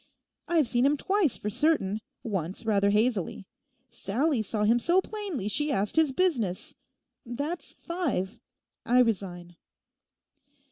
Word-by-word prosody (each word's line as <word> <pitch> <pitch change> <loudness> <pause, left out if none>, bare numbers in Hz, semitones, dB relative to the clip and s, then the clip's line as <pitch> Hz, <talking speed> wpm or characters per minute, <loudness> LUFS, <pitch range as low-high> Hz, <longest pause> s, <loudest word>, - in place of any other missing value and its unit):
I've 325 -6 +2
seen 240 0 +1
him 290 +1 +2
twice 385 - +1
for 210 - -4
certain, 230 -6 +1 0.2
once 190 -1 -3
rather 200 -2 +3
hazily; 210 -3 0 0.5
Sallie 240 +4 0
saw 215 0 -1
him 230 +3 +4
so 345 +9 +3
plainly 380 - -3
she 295 +7 +2
asked 205 -5 -1
his 320 -3 +4
business: 255 - 0 0.5
that's 285 +8 -5
five. 325 - -3 0.4
I 245 +2 +2
resign. 180 -6 -2
240 Hz, 125 wpm, -28 LUFS, 200-310 Hz, 0.5 s, him